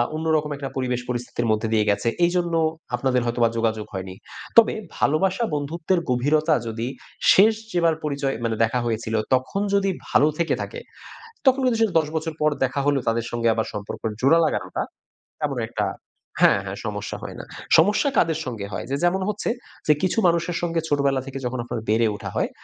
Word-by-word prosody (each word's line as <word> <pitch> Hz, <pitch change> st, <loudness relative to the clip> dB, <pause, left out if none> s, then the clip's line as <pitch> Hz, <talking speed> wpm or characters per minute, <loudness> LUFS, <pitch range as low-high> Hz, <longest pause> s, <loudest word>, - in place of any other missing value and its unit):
অন্যরকম 155 Hz, -2 st, 0 dB
একটা 140 Hz, -1 st, -5 dB
পরিবেশ 125 Hz, -1 st, -1 dB
পরিস্থিতির 120 Hz, -1 st, -2 dB
মধ্যে 110 Hz, +1 st, 0 dB
দিয়ে 105 Hz, -1 st, +2 dB
গেছে। 100 Hz, +3 st, 0 dB, 0.2 s
এইজন্য 175 Hz, -1 st, 0 dB, 0.4 s
আপনাদের 125 Hz, 0 st, +1 dB
হয়তোবা 120 Hz, -1 st, +2 dB
যোগাযোগ 110 Hz, -2 st, 0 dB
হয়নি। 95 Hz, 0 st, -5 dB, 0.4 s
তবে 230 Hz, -, +7 dB, 0.2 s
ভালোবাসা 190 Hz, +8 st, +2 dB
বন্ধুত্বের 165 Hz, +5 st, -1 dB
গভীরতা 150 Hz, +5 st, +2 dB
যদি 115 Hz, +2 st, -3 dB, 0.5 s
শেষ 215 Hz, +4 st, +6 dB, 0.2 s
যেবার 170 Hz, -2 st, +3 dB
পরিচয় 140 Hz, -2 st, -1 dB
মানে 115 Hz, -1 st, 0 dB
দেখা 120 Hz, +2 st, +1 dB
হয়েছিল 110 Hz, -1 st, -2 dB, 0.2 s
তখন 130 Hz, +10 st, -2 dB
যদি 195 Hz, -1 st, +2 dB, 0.2 s
ভালো 150 Hz, -, +4 dB
থেকে 170 Hz, -, +1 dB
থাকে, 480 Hz, -, -6 dB, 0.7 s
তখন 265 Hz, +1 st, +5 dB
কিন্তু 240 Hz, -3 st, +2 dB
সেটা 215 Hz, -5 st, +2 dB
১০ 150 Hz, -, -4 dB
বছর 160 Hz, 0 st, -3 dB
পর 155 Hz, 0 st, +4 dB
দেখা 135 Hz, +2 st, -1 dB
হলো 145 Hz, -1 st, +3 dB
তাদের 115 Hz, 0 st, 0 dB
সঙ্গে 115 Hz, -1 st, 0 dB
আবার 110 Hz, -, -1 dB
সম্পর্ক 105 Hz, 0 st, -6 dB, 0.2 s
জোড়া 140 Hz, +6 st, +5 dB
লাগানোটা 155 Hz, -, -1 dB, 0.7 s
এমন -, -, -4 dB
একটা -, -, -1 dB, 0.6 s
হ্যাঁ, -, -, +6 dB
হ্যাঁ -, -, -5 dB
সমস্যা -, -, -4 dB
হয় -, -, -6 dB
না। -, -, -6 dB, 0.3 s
সমস্যা 210 Hz, -, +4 dB
কাদের 160 Hz, -1 st, +2 dB
সঙ্গে 110 Hz, -6 st, -4 dB
হয়? -, -, -4 dB
যে -, -, +1 dB
যেমন 190 Hz, +2 st, +2 dB
হচ্ছে 210 Hz, -, -2 dB, 0.4 s
যে 150 Hz, -, +7 dB
কিছু 185 Hz, -, +1 dB
মানুষের 170 Hz, 0 st, +1 dB
সঙ্গে 165 Hz, -1 st, 0 dB
ছোটবেলা 140 Hz, -2 st, +2 dB
থেকে 135 Hz, 0 st, -5 dB
যখন 125 Hz, 0 st, -2 dB
আপনার 120 Hz, -2 st, -4 dB
বেড়ে 115 Hz, +1 st, +3 dB
ওঠা -, -, -6 dB
হয়, -, -, 0 dB
140 Hz, 180 wpm, -23 LUFS, 120-170 Hz, 0.7 s, তবে